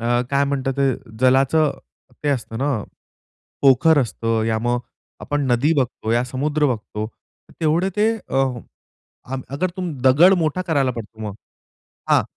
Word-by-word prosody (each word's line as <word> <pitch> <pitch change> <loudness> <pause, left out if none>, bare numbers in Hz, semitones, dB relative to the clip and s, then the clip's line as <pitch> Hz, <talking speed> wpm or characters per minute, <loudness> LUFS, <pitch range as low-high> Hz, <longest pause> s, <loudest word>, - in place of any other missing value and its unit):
अ, 115 - -3 0.2
काय 140 0 +3
म्हणतात 135 -1 -1
ते 135 -1 +3 0.3
जलाचं, 135 +4 +3 0.5
ते - - +1
असतं 115 -5 -2
ना, 135 -5 0 0.8
पोखर 140 +4 +5
असतं 115 -1 -1
या 110 -1 +1
मग, 120 +2 0 0.4
आपण 145 -2 -2
नदी 130 +6 +3
बघतो 120 -3 -2
या 120 +1 +2
समुद्र 145 +4 0
बघतो 110 -3 -3 0.5
तेवढे 165 +4 +2
ते 215 +2 +3 0.2
अ, 135 +1 +3 0.8
आग 130 +1 -4
अगर 170 +7 -1
तुम 180 -3 -3
दगड 150 +9 +6
मोठा 165 +2 0
करायला 140 -7 +1
पडतो 110 -1 -9
मग. 105 -2 -5 0.8
हां. - - +5
135 Hz, 145 wpm, -21 LUFS, 120-150 Hz, 0.8 s, दगड